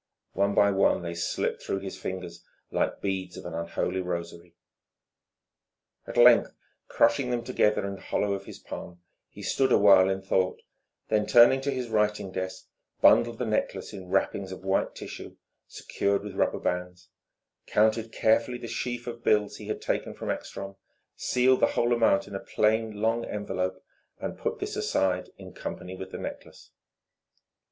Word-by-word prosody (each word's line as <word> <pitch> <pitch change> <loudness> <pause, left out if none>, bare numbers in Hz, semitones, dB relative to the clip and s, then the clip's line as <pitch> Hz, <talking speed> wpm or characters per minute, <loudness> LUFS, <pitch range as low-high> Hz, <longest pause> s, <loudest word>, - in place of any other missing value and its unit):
One 100 0 +1
by 100 0 +5
one 95 -2 +2
they 85 -1 -4
slipped 85 - -2
through 95 - -3
his 95 -1 -6
fingers 90 -2 -6 0.3
like - - -1
beads 95 -2 -3
of - - -9
an 85 - -6
unholy 85 +2 -2
rosary. 85 -1 -6 1.5
At - - -6
length, - - +6 0.3
crushing 125 +3 +2
them 120 -1 -1
together 105 -3 +1
in 100 - -3
the 95 - -10
hollow 105 -1 -1
of 100 0 -5
his - - -9
palm, 85 0 -9 0.3
he - - -11
stood 135 -1 +1
a - - +6
while 95 -2 +6
in 95 0 -2
thought, 95 -1 +1 0.5
then 105 -1 +1
turning 120 +3 +7
to 140 +1 -1
his 130 -3 -3
writing 105 -3 0
desk 95 0 -5 0.3
bundled 120 -1 +5
the 125 - -2
necklace 110 -2 -2
in 95 -3 -8
wrappings 95 0 0
of 95 - -8
white 95 0 0
tissue - - -8 0.3
secured 100 0 -1
with 105 - -7
rubber - - 0
bands, 90 0 -3 0.6
counted 110 +1 +2
carefully 115 +3 +2
the 120 - -8
sheaf 120 +1 -4
of 120 -1 -7
bills 105 -1 +2
he 105 - -10
had 110 - -4
taken - - -2
from - - -3
Ekstrom, 100 0 -6 0.4
sealed 130 +1 +2
the - - +5
whole 120 +1 +3
amount 110 -5 +3
in 100 - -10
a 95 - -3
plain, 110 0 0
long 115 +1 +1
envelope, 95 -3 -3 0.4
and - - -5
put - - -2
this - - -4
aside 90 -1 0
in - - -11
company 90 +1 -6
with 95 0 -7
the - - -7
necklace. - - -9
100 Hz, 170 wpm, -27 LUFS, 95-115 Hz, 1.5 s, turning